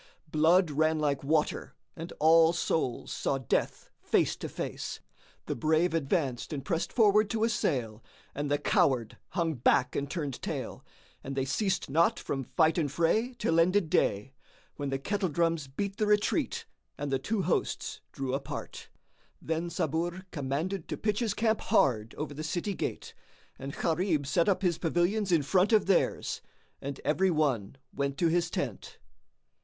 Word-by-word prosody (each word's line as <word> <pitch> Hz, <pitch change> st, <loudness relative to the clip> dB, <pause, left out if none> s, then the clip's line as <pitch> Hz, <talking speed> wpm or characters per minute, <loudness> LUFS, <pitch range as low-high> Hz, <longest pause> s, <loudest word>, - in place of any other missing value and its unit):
Blood 165 Hz, +2 st, +4 dB
ran 155 Hz, +2 st, +2 dB
like 145 Hz, -3 st, 0 dB
water 150 Hz, +2 st, 0 dB, 0.2 s
and 165 Hz, +1 st, -7 dB
all 165 Hz, +1 st, +6 dB
souls 160 Hz, -7 st, -1 dB
saw 135 Hz, -, -1 dB
death 130 Hz, -4 st, -2 dB
face -, -, +1 dB
to -, -, -6 dB
face; -, -, -5 dB, 0.5 s
the -, -, -2 dB
brave 160 Hz, +7 st, +2 dB
advanced 140 Hz, -5 st, -1 dB
and 140 Hz, -3 st, -4 dB
pressed 165 Hz, +2 st, -1 dB
forward 210 Hz, -2 st, +4 dB
to 220 Hz, +1 st, 0 dB
assail 125 Hz, -, -1 dB, 0.3 s
and 145 Hz, 0 st, -3 dB
the 145 Hz, -, +2 dB
coward 120 Hz, -5 st, +1 dB, 0.2 s
hung 165 Hz, -3 st, 0 dB
back 125 Hz, -1 st, +2 dB
and 140 Hz, 0 st, -2 dB
turned 145 Hz, -6 st, -4 dB
tail -, -, -5 dB, 0.4 s
and 135 Hz, 0 st, -5 dB
they 135 Hz, -1 st, 0 dB
ceased 190 Hz, +8 st, 0 dB
not 165 Hz, +5 st, +3 dB
from 135 Hz, -1 st, -3 dB
fight 160 Hz, +6 st, +2 dB
and 145 Hz, -4 st, 0 dB
fray 215 Hz, -, +1 dB
till 165 Hz, -7 st, +2 dB
ended 180 Hz, 0 st, +3 dB
day, 105 Hz, +7 st, +1 dB, 0.4 s
when 145 Hz, -1 st, -3 dB
the 135 Hz, -, -1 dB
kettle 195 Hz, +6 st, -1 dB
drums 165 Hz, -1 st, 0 dB
beat 195 Hz, +9 st, -4 dB
the 215 Hz, -, +1 dB
retreat 210 Hz, 0 st, +1 dB, 0.3 s
and 145 Hz, -1 st, -3 dB
the 135 Hz, -, +1 dB
two 205 Hz, +7 st, -1 dB
hosts -, -, -1 dB
drew 135 Hz, -1 st, -3 dB
apart. 135 Hz, +1 st, -5 dB, 0.5 s
Then 165 Hz, +2 st, -2 dB
Sabur 170 Hz, +2 st, -2 dB
commanded 155 Hz, +5 st, -3 dB
to -, -, -4 dB
pitch 210 Hz, -1 st, 0 dB
his 225 Hz, -5 st, 0 dB
camp 220 Hz, -1 st, +1 dB
hard 115 Hz, -4 st, +2 dB
over 150 Hz, -1 st, -4 dB
the 155 Hz, +2 st, -6 dB
city 175 Hz, +5 st, -2 dB
gate, -, -, -4 dB, 0.5 s
and 135 Hz, +1 st, -5 dB
Gharib 165 Hz, -3 st, 0 dB
set 170 Hz, +7 st, +2 dB
up 195 Hz, 0 st, +1 dB
his 175 Hz, -3 st, +1 dB
pavilions 180 Hz, +4 st, +1 dB
in 165 Hz, -4 st, +4 dB
front 180 Hz, -, +3 dB
of 215 Hz, -3 st, +4 dB
theirs; 195 Hz, -2 st, +1 dB, 0.4 s
and 140 Hz, 0 st, -5 dB
every 190 Hz, +5 st, +2 dB
one 140 Hz, -, 0 dB, 0.2 s
went 140 Hz, -1 st, -2 dB
to 170 Hz, -, +3 dB
his 170 Hz, 0 st, +1 dB
tent. -, -, -4 dB
160 Hz, 165 wpm, -29 LUFS, 140-185 Hz, 0.5 s, all